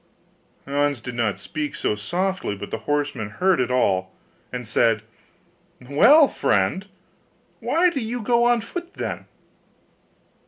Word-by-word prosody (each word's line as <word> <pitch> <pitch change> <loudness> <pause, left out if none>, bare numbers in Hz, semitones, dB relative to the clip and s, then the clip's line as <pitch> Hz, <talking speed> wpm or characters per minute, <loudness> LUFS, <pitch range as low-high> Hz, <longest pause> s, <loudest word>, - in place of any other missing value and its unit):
Hans 145 -1 0
did 125 +2 -7
not 115 -5 -1
speak 150 +9 -5
so - - 0
softly 175 - -2
but 100 +1 -8
the 110 - -3
horseman 145 -8 -1
heard 185 - +1
it 125 - -1
all, 95 -7 +1 0.4
and 125 -2 -5
said, 115 -1 +2 0.8
'Well, 235 - +6
friend, 110 - 0 0.7
why 355 +2 +2
do 280 - -2
you 235 0 -4
go 235 +1 +3
on 240 -1 +3
foot 345 +10 -7
then? - - -4
145 Hz, 130 wpm, -23 LUFS, -, 0.8 s, Well